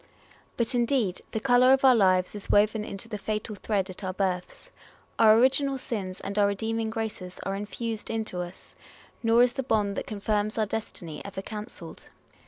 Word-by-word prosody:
But, 235 Hz, +2 st, 0 dB
indeed, 235 Hz, -6 st, +1 dB
the 220 Hz, -, -2 dB
colour 250 Hz, +2 st, +5 dB
of 270 Hz, 0 st, +3 dB
our 260 Hz, -, +8 dB
lives 185 Hz, -4 st, +3 dB
is 205 Hz, -1 st, -8 dB
woven 210 Hz, +1 st, +3 dB
into 200 Hz, +1 st, -7 dB
the 210 Hz, -2 st, -5 dB
fatal 215 Hz, +1 st, -3 dB
thread 200 Hz, -1 st, -1 dB
at 185 Hz, +1 st, -9 dB
our 185 Hz, 0 st, -2 dB
births: 190 Hz, -, -3 dB, 0.5 s
our 220 Hz, -1 st, +7 dB
original 270 Hz, +3 st, +3 dB
sins, 195 Hz, -7 st, -4 dB
and 200 Hz, +1 st, -3 dB
our 200 Hz, -, +5 dB
redeeming 220 Hz, +2 st, -1 dB
graces 215 Hz, -5 st, -5 dB
are 195 Hz, -, -2 dB
infused 215 Hz, +2 st, -4 dB
into 220 Hz, -5 st, -2 dB
us; 175 Hz, +1 st, -10 dB, 0.5 s
nor 230 Hz, +1 st, +5 dB
is 245 Hz, -1 st, +2 dB
the 270 Hz, -, -2 dB
bond, 210 Hz, -5 st, 0 dB
that -, -, -3 dB
confirms 210 Hz, +1 st, -1 dB
our 220 Hz, -, +2 dB
destiny, 185 Hz, -7 st, -6 dB
ever 195 Hz, -1 st, -6 dB
cancelled. 210 Hz, -6 st, -8 dB
215 Hz, 180 wpm, -27 LUFS, 195-230 Hz, 0.5 s, our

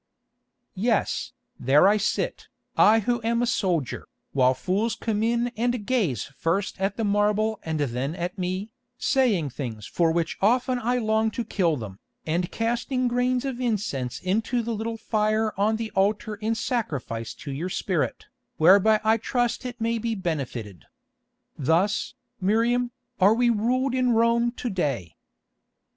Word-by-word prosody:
"Yes, 220 Hz, +2 st, 0 dB, 0.3 s
there 145 Hz, +8 st, +5 dB
I 210 Hz, +2 st, +4 dB
sit, 210 Hz, -, -2 dB, 0.3 s
I 220 Hz, +1 st, +6 dB
who 240 Hz, +3 st, 0 dB
am 235 Hz, +1 st, +1 dB
a -, -, +3 dB
soldier, 180 Hz, -, -1 dB, 0.3 s
while 130 Hz, -1 st, +4 dB
fools 200 Hz, -, -1 dB
come 215 Hz, -2 st, -2 dB
in 235 Hz, +2 st, +1 dB
and 240 Hz, -1 st, -1 dB
gaze 200 Hz, -, 0 dB
first 175 Hz, +7 st, -2 dB
at 195 Hz, +1 st, 0 dB
the 225 Hz, -, -1 dB
marble 210 Hz, +1 st, +1 dB
and 160 Hz, -1 st, -3 dB
then 135 Hz, +3 st, -2 dB
at 175 Hz, +1 st, -4 dB
me, 185 Hz, +3 st, -3 dB, 0.3 s
saying 215 Hz, -, +1 dB
things 115 Hz, -6 st, -6 dB
for 165 Hz, -2 st, +1 dB
which 165 Hz, -1 st, -1 dB
often 245 Hz, +4 st, +2 dB
I 245 Hz, +1 st, 0 dB
long 220 Hz, -1 st, +1 dB
to 230 Hz, +2 st, -4 dB
kill 170 Hz, -6 st, +1 dB
them, 105 Hz, -5 st, -8 dB, 0.3 s
and 170 Hz, +3 st, -1 dB
casting 240 Hz, +3 st, -1 dB
grains 250 Hz, +1 st, +1 dB
of 255 Hz, -2 st, -3 dB
incense 200 Hz, -, -2 dB
into 225 Hz, +6 st, 0 dB
the 230 Hz, +1 st, -2 dB
little 225 Hz, +1 st, -3 dB
fire 215 Hz, -1 st, 0 dB
on 210 Hz, +3 st, +2 dB
the 225 Hz, 0 st, -4 dB
altar 205 Hz, +2 st, +1 dB
in 220 Hz, +2 st, -2 dB
sacrifice 135 Hz, -, -3 dB
to 145 Hz, -, -7 dB
your 160 Hz, +7 st, -3 dB
spirit, -, -, -2 dB, 0.3 s
whereby 200 Hz, +6 st, +6 dB
I 220 Hz, +1 st, +4 dB
trust 245 Hz, +2 st, -1 dB
it 245 Hz, -1 st, -8 dB
may 230 Hz, 0 st, 0 dB
be 230 Hz, 0 st, -2 dB
benefited. 130 Hz, -, -4 dB, 0.7 s
Thus, 165 Hz, +9 st, +1 dB, 0.2 s
Miriam, 230 Hz, +5 st, +2 dB, 0.3 s
are 200 Hz, +3 st, +5 dB
we 240 Hz, 0 st, +3 dB
ruled 250 Hz, +4 st, +1 dB
in 255 Hz, -2 st, +2 dB
Rome 235 Hz, +1 st, +3 dB
to 245 Hz, -, -4 dB
day. 135 Hz, -, -2 dB
215 Hz, 155 wpm, -25 LUFS, 170-235 Hz, 0.7 s, I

